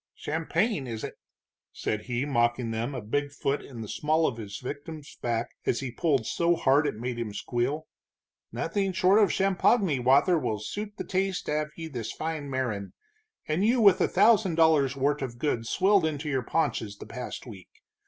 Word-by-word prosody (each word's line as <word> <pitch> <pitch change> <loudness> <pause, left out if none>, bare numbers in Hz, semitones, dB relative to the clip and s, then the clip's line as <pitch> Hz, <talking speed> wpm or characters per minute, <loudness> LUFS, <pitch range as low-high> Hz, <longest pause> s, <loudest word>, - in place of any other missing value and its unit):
"Champagne, 160 - -1
is 115 -2 -5
it?" - - -5 0.6
said 105 0 -3
he, 125 +2 -1
mocking 120 -3 +1
them, 115 +5 -2
a 125 - -5
big 145 +7 -1
foot 140 0 -1
in 120 -4 -9
the 110 - -6
small 155 +7 +1
of 130 - 0
the 105 -3 -7
victim's 145 +3 -7
back 115 -1 -1 0.2
as 120 - +2
he 135 -3 -4
pulled 140 -4 +1
so 170 +7 +2
hard 145 0 +3
it - - -2
made 120 +2 -4
him 115 -3 -3
squeal. 125 +8 -2 0.7
"Nothing 195 -2 -1
short 185 +4 +4
of 205 - +5
champoggany 195 - +2
wather 140 +8 +4
will 110 -7 -1
suit 205 - -6
the - - -3
taste 190 0 -1
av 150 0 0
ye 165 -1 -6
this 120 -7 -5
fine 155 -3 -4
marin', 120 -7 -3 0.5
and 155 +5 0
you 240 +4 +3
with 200 -4 +6
a - - +4
thousand 205 -3 +4
dollars' 155 -5 +4
wort' 140 +2 0
of 125 -3 -4
goods 120 -4 -1
swilled 190 -3 +3
into 150 -1 -4
your 135 -3 0
paunches 110 -8 -1
the - - -9
past 125 +1 -7
week! 100 -7 -11
145 Hz, 185 wpm, -28 LUFS, 120-170 Hz, 0.7 s, with